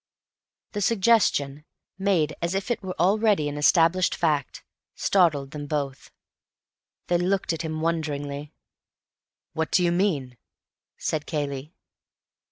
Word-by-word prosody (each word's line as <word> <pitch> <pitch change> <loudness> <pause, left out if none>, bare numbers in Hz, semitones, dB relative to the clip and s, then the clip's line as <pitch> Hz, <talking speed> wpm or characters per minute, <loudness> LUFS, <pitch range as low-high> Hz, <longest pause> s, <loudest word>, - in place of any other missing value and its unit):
The 205 - -3
suggestion, 190 -10 +2 0.4
made 175 -6 +1
as 170 +2 -1
if 195 +5 -2
it 235 - -1
were 185 -3 -6
already 200 -2 +3
an 145 - -4
established 170 +4 +3
fact, 150 -5 -1 0.3
startled 150 -8 +2
them 145 -1 -6
both. 140 -3 -3 1.0
They 175 -1 +1
looked 185 -1 0
at 165 - -4
him 155 -1 -4
wonderingly. 145 -3 -2 1.0
"What 160 0 -1
do 180 - +3
you 170 - +3
mean?" 155 -10 0 0.6
said 155 -2 -2
Cayley. 145 0 -4
160 Hz, 120 wpm, -25 LUFS, 145-185 Hz, 1.0 s, already